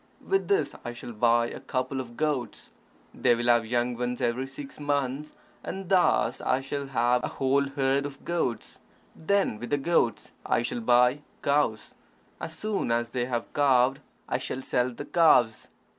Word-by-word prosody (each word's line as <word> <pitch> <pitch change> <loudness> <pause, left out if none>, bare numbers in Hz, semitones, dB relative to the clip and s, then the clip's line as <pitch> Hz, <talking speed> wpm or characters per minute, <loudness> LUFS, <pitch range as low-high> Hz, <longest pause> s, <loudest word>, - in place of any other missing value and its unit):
With 390 0 +1
this 405 0 +1
I 120 - -5
shall 120 - -8
buy 115 +1 +3
a - - -7
couple 130 0 -2
of 120 -2 -11
goats. 150 -6 -2 0.4
They 120 - +3
will 120 +1 -3
have 120 -2 +3
young 120 +1 0
ones 125 +1 -3
every 125 +1 -1
six 135 +1 -9
months, 145 0 -2 0.3
and 190 -1 -6
thus 185 -2 +3
I 130 - +1
shall 140 +1 -4
have 125 -1 +1
a - - 0
whole 140 +1 +1
herd 135 +1 0
of 140 -1 -13
goats. 170 -9 -2 0.4
Then, 195 - 0
with 120 - -6
the 145 - +2
goats, 135 -7 0
I 120 - +1
shall 120 0 -3
buy 125 +4 +4 0.2
cows. 140 -6 +1 0.5
As 165 0 -6
soon 210 - -1
as 120 0 0
they 125 -2 -1
have 120 -2 -3
calved, 135 -1 +3 0.3
I - - -1
shall 130 - -4
sell 125 0 +1
the 135 +4 -8
calves. 145 -10 +4
130 Hz, 175 wpm, -27 LUFS, 120-145 Hz, 0.5 s, buy